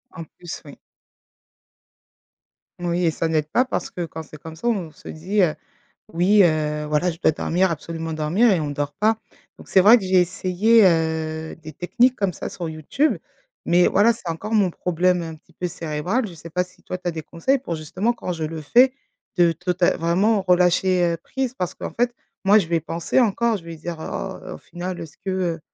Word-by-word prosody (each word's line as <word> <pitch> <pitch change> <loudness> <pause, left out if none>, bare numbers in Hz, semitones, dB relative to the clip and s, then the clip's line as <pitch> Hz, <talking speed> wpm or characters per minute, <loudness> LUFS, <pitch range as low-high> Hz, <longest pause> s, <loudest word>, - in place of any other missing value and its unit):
En 165 - -6
plus, 175 +2 -9
oui. 145 - -12 2.0
Oui 175 0 0
et 165 - +3
ça 165 - -2
n'aide 155 -2 0
pas 250 - +2
parce - - -3
que 175 - -4
quand 160 0 -8
c'est 155 - -12
comme 160 0 -9
ça 165 - -4
on 195 -9 -1
se 150 - -16
dit, 190 +6 -1
heu: 165 -4 +2 0.6
«Oui, 190 +5 +5
heu, 150 -2 0
voilà 150 +4 +1
je 160 - -7
dois 160 - +3
dormir 180 +4 +1
absolument 165 0 -4
dormir 160 +10 +2
et 175 - +2
on 150 - -2
dort 145 0 -3
pas». 220 +1 +1 0.4
Donc - - -14
c'est 190 - +5
vrai 210 +6 +8
que 215 - -3
j'ai 185 -1 +4
essayé, 190 +5 +3
heu, 160 -2 0
des 155 -1 -11
techniques 245 - +2
comme 200 -6 -1
ça - - -5
sur 170 -2 -5
YouTube, 160 - 0 0.5
mais 175 +1 +4
voilà 220 +4 +4
c'est 225 -6 -9
encore 165 +7 -4
mon 205 -4 +3
problème 180 +1 +1
un 165 -1 -6
petit 155 - -22
peu 180 - -3
cérébral, 170 +8 -2
je 180 - -10
sais 165 +1 -11
pas 180 +3 +1
si 180 0 -23
toi 185 - -5
tu 180 - -4
as - - +2
des 160 -1 -6
conseils 175 - 0
pour 245 -10 -5
justement 185 +9 -1
quand 210 -6 -5
je 165 -2 -4
le 160 0 -4
fais, 245 - +5 0.4
de 175 -1 +5
total 175 +1 0
vraiment 190 +6 +2
relâcher, 180 0 +3
heu, - - -3
prise 260 +7 -4
parce 180 -9 -3
qu'en - - -6
fait, 245 0 0 0.3
moi 205 +2 +6
je 180 -6 -1
vais 165 -1 +1
penser 165 - -1
encore. 235 -1 +2
Je 175 - -11
vais 165 0 -7
dire: 170 +2 -6
«Oh, 185 +2 -6
au - - -9
final, 180 +1 -6
est-ce 155 -3 -9
que, 195 - -5
heu 175 -3 -1
175 Hz, 210 wpm, -22 LUFS, 160-195 Hz, 2.0 s, vrai